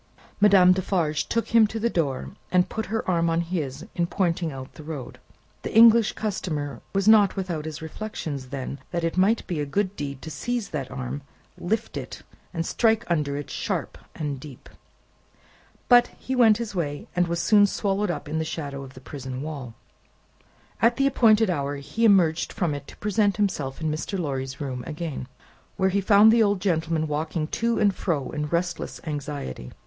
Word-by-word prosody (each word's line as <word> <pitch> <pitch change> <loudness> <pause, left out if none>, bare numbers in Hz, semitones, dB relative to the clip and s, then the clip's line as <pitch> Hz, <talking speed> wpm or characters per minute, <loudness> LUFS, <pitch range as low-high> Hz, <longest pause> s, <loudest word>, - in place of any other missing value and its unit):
Madame 195 -3 +7
Defarge 170 -5 0
took 230 - 0
him 230 -2 +6
to 225 +2 -5
the 230 - +1
door, 150 - -1 0.2
and 180 -1 +3
put 220 -1 -4
her 225 +3 -2
arm 170 -2 +2
on 165 +1 +1
his, 155 -6 -4
in 170 -1 0
pointing 170 -3 0
out 130 -1 -8
the - - -11
road. 150 -5 -7 0.4
The - - -5
English 230 -1 +7
customer 155 -9 -3
was 195 +1 +1
not 210 -3 +6
without 175 -6 -3
his 160 0 -6
reflections 160 -6 -5
then, 135 +1 -5
that 170 -1 -2
it 165 - -1
might 200 +5 +3
be 170 -4 -3
a 145 - -1
good 195 +6 -1
deed 140 -4 -5
to 160 - -6
seize 240 +4 -3
that 135 -4 -4
arm, 135 +2 -5 0.3
lift 220 +5 -2
it, - - -7 0.3
and 165 -2 -3
strike 225 +2 +2
under 145 -4 0
it 145 - -6
sharp - - -3 0.2
and 145 -3 -3
deep. 135 -2 -12 1.2
But, 245 -1 +7
he 260 - -3
went 225 -4 +6
his 230 -3 -5
way, 145 -6 -3
and 180 -1 +2
was 170 0 -1
soon 205 +3 +5
swallowed 200 0 -1
up 175 - -3
in 155 +2 -2
the - - 0
shadow 145 -3 -5
of 135 -1 -11
the - - -11
prison 130 -1 -6
wall. 140 -7 -6 1.1
At 235 +1 +4
the 275 - +2
appointed 225 -6 +4
hour, 145 -3 -2
he 145 +11 -1
emerged 175 -6 +4
from 175 -8 0
it 145 -1 -6
to - - -13
present 210 -1 +1
himself 160 -10 -1
in 160 -1 -1
Mr. 155 +6 -3
Lorry's 135 -5 -3
room 130 -3 -4
again, 155 -5 -5 0.5
where 190 0 +3
he 200 +1 +1
found 205 +2 +7
the 230 0 +4
old 205 -2 +3
gentleman 165 -4 0
walking 155 +1 -2 0.2
to 235 0 +2
and 205 -2 +3
fro 155 -8 -2
in 150 -1 -3
restless 170 +2 -2
anxiety. 145 - -5
170 Hz, 185 wpm, -25 LUFS, 145-205 Hz, 1.2 s, Madame